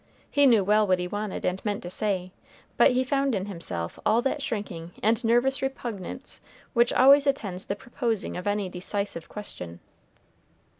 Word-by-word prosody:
He 285 -1 +5
knew 225 -6 +5
well 210 +2 +3
what 185 -1 +3
he 180 0 -3
wanted 205 +1 -4
and 180 +1 -1
meant 205 -2 -2
to 175 - -5
say, 185 -3 +1 0.4
but - - +6
he 255 0 +2
found 275 -1 +1
in 190 -1 -2
himself 95 - -5
all 225 - +3
that 280 +2 -1
shrinking 185 - -5
and 225 +3 +2
nervous 240 +4 +2
repugnance 240 -8 -5 0.3
which 240 -1 +4
always 280 +2 +6
attends 195 -9 -1
the 200 - -1
proposing 230 -1 -3
of 180 +2 -5
any 205 -1 0
decisive 180 -1 -4
question. 90 - -7
210 Hz, 165 wpm, -26 LUFS, 185-245 Hz, 0.4 s, but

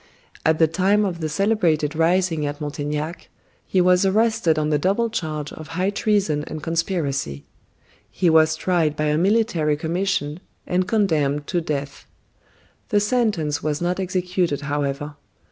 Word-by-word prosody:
At 160 0 +3
the 160 - +5
time 195 +6 +2
of 175 -4 -3
the 155 -1 -2
celebrated 165 -5 +1
rising 165 -1 +2
at 145 0 -5
Montaignac, 150 +2 -4 0.4
he 190 - +1
was 180 +1 +4
arrested 215 -4 +2
on 155 0 0
the 150 - +2
double 205 +8 +1
charge 155 -6 -4
of 155 - -9
high 185 +2 +1
treason 200 -8 +1
and 155 -1 -7
conspiracy. 160 - -2 0.6
He 180 - 0
was 160 -1 +5
tried 160 -2 +1
by 150 0 0
a 150 - +2
military 180 -6 +2
commission, 165 -2 -1 0.3
and 180 +1 0
condemned 150 -10 +1
to 175 +2 -1
death. 140 -3 -5 0.8
The 210 - +3
sentence 205 -9 0
was 150 -1 -1
not 175 +2 -1
executed, 180 -4 -1
however. 145 0 -3
165 Hz, 145 wpm, -22 LUFS, 150-190 Hz, 0.8 s, the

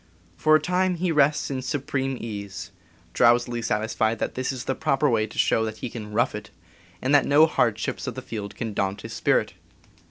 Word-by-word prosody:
For 155 0 +4
a - - +5
time 180 +3 +1
he 175 0 -1
rests 150 -1 +2
in 130 -1 -2
supreme 135 -1 -2
ease, 100 -4 -6 0.4
drowsily 120 0 +3
satisfied 110 0 0
that - - -3
this 130 +1 -2
is 130 -3 -5
the 135 - -1
proper 135 +3 +1
way 110 -4 +1
to - - -13
show 110 - +3
that 110 -1 -4
he 120 - -6
can 105 -3 -7
"rough 115 +3 +1
it," 105 +1 -7 0.5
and 130 +3 +1
that 145 - +5
no 145 +3 +6
hardships 115 -8 -1
of - - -4
the - - -6
field 105 -3 -6
can 115 -2 -4
daunt 100 0 -2
his - - -8
spirit. - - +1
120 Hz, 200 wpm, -25 LUFS, 110-140 Hz, 0.5 s, no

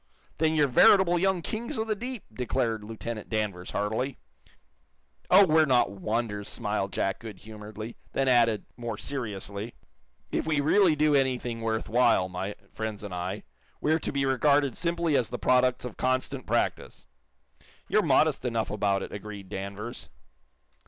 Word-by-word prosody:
"Then 160 0 +2
you're 150 -2 +4
veritable 175 +6 +5
young 190 -2 +1
kings 235 +6 -3
of 220 - -1
the 215 -1 -1
deep!" 245 +1 -5
declared 115 -2 -1
Lieutenant 110 0 -6
Danvers, 105 -5 -2
heartily. 110 +6 -2 1.1
"Oh, 195 +2 +8
we're 160 -2 +4
not 125 -6 +3
wonders," 105 +1 -3
smiled 105 -3 -2
Jack, 95 0 -1
goodhumoredly; 110 +1 -9 0.2
then 135 - +1
added, 115 -4 +3
more 120 -3 -5
seriously, 105 -4 -4 0.6
"If - - -1
we 155 -2 +2
really 160 +3 +4
do 150 0 +3
anything 125 -4 0
worth 110 -1 -1
while, 115 -5 +3
my 95 +3 -4 0.2
friends 110 -2 -5
and 100 -3 -6
I, 90 +3 -4 0.4
we're 155 +2 +2
to - - -3
be 140 -1 0
regarded 140 0 +2
simply 170 -3 0
as 125 -4 +1
the - - -4
products 125 0 +2
of 125 - -7
constant 130 +1 -1
practice." - - -1 0.8
"You're - - +3
modest - - +3
enough 115 -3 -1
about 100 -2 0
it," - - -7
agreed 100 -2 -8
Danvers. 100 +5 -6
120 Hz, 150 wpm, -28 LUFS, 105-145 Hz, 1.1 s, Oh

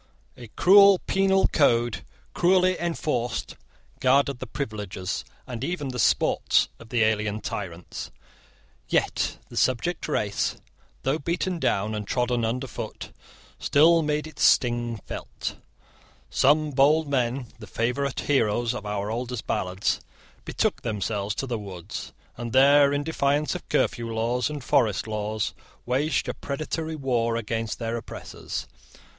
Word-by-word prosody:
A 120 - -10
cruel 200 +1 +7
penal 195 0 +3
code, 120 -6 +2 0.3
cruelly 185 +1 +4
enforced, 150 -8 -2 0.4
guarded 135 0 +3
the 130 - -6
privileges, 105 -7 -4 0.2
and 125 -2 -6
even 150 -3 -2
the 125 -1 -4
sports, 85 -8 +3
of 115 - -13
the 120 -1 +2
alien 105 -1 +1
tyrants. 90 -5 -6 0.8
Yet - - 0
the - - -11
subject 130 +7 +1
race, 105 -9 0 0.5
though 135 +4 +1
beaten 170 +3 -2
down 105 -6 0
and 105 -1 -4
trodden 120 -1 0
underfoot, 125 +4 -4 0.5
still 165 +3 +5
made 150 0 -1
its 155 -2 -9
sting 120 -2 +3
felt. - - -6 0.7
Some 150 +2 +3
bold 145 +4 +4
men, 130 -1 0
the 105 - -10
favourite 125 +4 -1
heroes 120 -3 +1
of 105 -4 -6
our 105 0 -2
oldest 120 0 -4
ballads, 95 +1 -1 0.4
betook - - -1
themselves 105 -1 -2
to - - -2
the 120 -4 -3
woods, 95 -5 -7 0.3
and 120 -1 -5
there, 140 +2 +6
in 145 0 0
defiance 145 -1 +1
of - - -7
curfew 115 -1 0
laws 120 +3 0
and 150 -3 -6
forest 105 -6 +2
laws, 110 0 -2 0.3
waged 135 +5 0
a - - -1
predatory 155 +3 -4
war 120 -5 0
against 115 0 -2
their 115 0 -3
oppressors. 60 - -6
125 Hz, 130 wpm, -26 LUFS, 110-145 Hz, 0.8 s, cruel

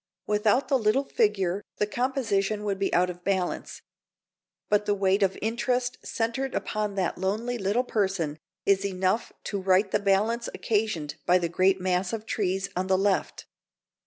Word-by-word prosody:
Without 210 +5 +2
the 270 - +2
little 220 +5 +2
figure 205 -7 +1 0.2
the 210 - +2
composition 215 -4 0
would 200 -2 -2
be 195 - 0
out 180 +1 +3
of 175 0 -13
balance. 190 -2 -2 0.8
But 210 0 +2
the 205 - +2
weight 195 0 +2
of 195 -1 +2
interest 245 +2 -1
centred 235 +4 -2
upon 210 -1 -2
that 185 -3 -1
lonely 220 +6 -1
little 205 +5 +1
person 190 -10 -1 0.3
is 195 0 +3
enough 190 +2 0
to 200 -2 -3
right 190 +1 +3
the - - +2
balance 210 +4 +1
occasioned 205 -9 -1
by 180 - +6
the 170 -2 -1
great 190 +2 +3
mass 180 +2 0
of 220 -1 -4
trees 195 -3 -1
on 185 +1 -1
the 190 0 +3
left. 195 0 0
200 Hz, 160 wpm, -27 LUFS, 190-220 Hz, 0.8 s, by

